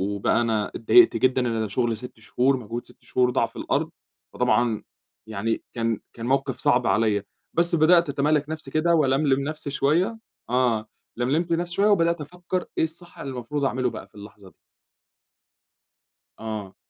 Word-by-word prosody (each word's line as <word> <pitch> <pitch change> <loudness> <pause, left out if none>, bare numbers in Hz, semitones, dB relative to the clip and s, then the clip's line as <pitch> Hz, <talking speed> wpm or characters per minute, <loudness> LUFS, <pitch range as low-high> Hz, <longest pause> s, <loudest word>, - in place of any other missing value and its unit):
وبقى 100 +3 +1
أنا 110 -3 0
اتضايقت 340 - +5
جدًا. 130 0 +2
أنا 115 -3 -1
شغل 115 +2 0
6 125 0 -9
شهور، 130 +5 +1
مجهود 120 0 -6
6 - - -20
شهور 125 -1 +1
ضاع - - +2
في - - -14
الأرض، - - -1 0.4
فطبعًا 120 -3 +1 0.4
يعني 110 +1 -2
كان 115 -2 -1
كان 115 - -7
موقف 135 0 0
صعب 125 0 +2
عليَّ. 105 -2 +2 0.3
بس 170 0 +2
بدأت 170 0 +5
أتمالك 145 +1 +1
نفسي 155 -3 -6
كده 170 +3 +2
وألملم 135 -2 +2
نفسي 150 -1 -5
شويّة. 170 +11 +1 0.3
آه، 120 -3 +1 0.3
لملمت 155 +8 0
نفسي 175 +1 -2
شويّة 200 +1 +3
وبدأت 170 -5 +2
أفكّر 180 +4 -4
إيه - - +3
الصح 170 +2 -7
اللي 135 - -5
المفروض 135 +4 -3
أعمله 130 -1 0
بقى - - -9
في - - -31
اللحظة 100 -1 -12
دي. - - -29 1.8
آه، 105 -4 -6
130 Hz, 160 wpm, -24 LUFS, 115-155 Hz, 1.8 s, اتضايقت